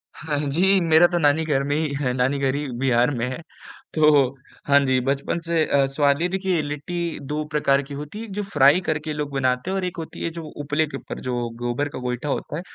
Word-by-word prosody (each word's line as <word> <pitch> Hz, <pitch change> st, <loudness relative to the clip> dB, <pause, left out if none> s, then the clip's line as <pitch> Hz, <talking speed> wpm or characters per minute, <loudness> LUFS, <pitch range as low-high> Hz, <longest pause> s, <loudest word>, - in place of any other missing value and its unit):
हाँ 150 Hz, -1 st, -3 dB
जी 190 Hz, +6 st, +4 dB
मेरा 165 Hz, +1 st, +6 dB
तो 175 Hz, -, -1 dB
नानी 150 Hz, 0 st, +3 dB
घर 140 Hz, -3 st, +1 dB
में 145 Hz, +1 st, -1 dB
ही 155 Hz, -2 st, -1 dB
है 125 Hz, -3 st, 0 dB
नानी 130 Hz, +3 st, +1 dB
घर 135 Hz, -1 st, +1 dB
ही 145 Hz, 0 st, -3 dB
बिहार 125 Hz, 0 st, +3 dB
में 125 Hz, -3 st, -2 dB
है। 130 Hz, +6 st, -6 dB, 0.5 s
तो 150 Hz, -3 st, +5 dB, 0.4 s
हाँ 140 Hz, 0 st, +6 dB
जी, 130 Hz, -1 st, +2 dB
बचपन 140 Hz, +5 st, -1 dB
से 165 Hz, -1 st, +1 dB
अ, 140 Hz, -1 st, +3 dB
स्वाद 140 Hz, +2 st, +1 dB
है 175 Hz, -, +2 dB
देखिए 190 Hz, -3 st, 0 dB
लिट्टी 155 Hz, +4 st, -4 dB
2 150 Hz, +1 st, -2 dB
प्रकार 140 Hz, -2 st, +2 dB
की 140 Hz, +1 st, -10 dB
होती 150 Hz, +9 st, -7 dB
है, 230 Hz, -, -7 dB
जो 205 Hz, +1 st, -2 dB
फ्राई 150 Hz, -3 st, +4 dB
करके 155 Hz, -2 st, -2 dB
लोग 150 Hz, -1 st, -4 dB
बनाते 130 Hz, +3 st, 0 dB
हैं -, -, -1 dB
और 190 Hz, -, -2 dB
एक 180 Hz, +1 st, -5 dB
होती 165 Hz, -1 st, -7 dB
है -, -, 0 dB
जो 165 Hz, -, -5 dB, 0.2 s
उपले 150 Hz, +2 st, 0 dB
के -, -, -6 dB
ऊपर -, -, -8 dB
जो 120 Hz, -1 st, -1 dB
गोबर 120 Hz, +4 st, -1 dB
का -, -, -7 dB
गोइठा 125 Hz, +3 st, -3 dB
होता 145 Hz, -, -3 dB
है, -, -, -4 dB
145 Hz, 235 wpm, -23 LUFS, 135-160 Hz, 0.5 s, मेरा